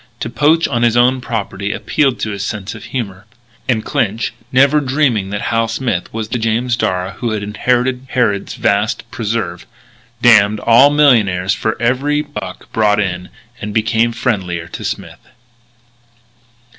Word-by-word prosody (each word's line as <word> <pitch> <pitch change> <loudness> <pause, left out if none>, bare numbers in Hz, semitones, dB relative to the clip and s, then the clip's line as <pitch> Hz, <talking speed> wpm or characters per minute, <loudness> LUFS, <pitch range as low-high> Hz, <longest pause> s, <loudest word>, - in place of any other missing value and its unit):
To 115 - -3
poach 150 +7 +3
on 120 - -1
his 120 0 +3
own 125 +1 +3
property 100 -4 -3
appealed 130 +6 0
to 110 - -1
his 100 -1 -4
sense 105 0 -4
of - - -10
humour. 105 -6 -5 0.4
And 110 -4 +1
Clinch, 120 -3 -1 0.2
never 140 +3 +4
dreaming 130 -8 0
that 105 0 -4
Hal 115 0 +1
Smith 115 -5 -2
was 110 -1 -4
the 125 - -2
James 115 +2 0
Darragh 90 -4 -2
who 120 - -2
had 105 -1 -3
inherited 125 +4 0
Harrod's 105 -6 0
vast 100 +2 0
preserve, 105 -6 -3 0.5
damned 110 -3 +5
all 120 +5 +6
millionaires 110 -11 +3
for 110 - -2
every 140 +5 +1
buck 95 -11 -8
brought 105 -1 +3
in, 90 -3 -2 0.3
and 105 0 -5
became 110 +1 +2
friendlier 95 -9 -2
to - - -7
Smith. - - -5
115 Hz, 150 wpm, -16 LUFS, 100-125 Hz, 0.5 s, all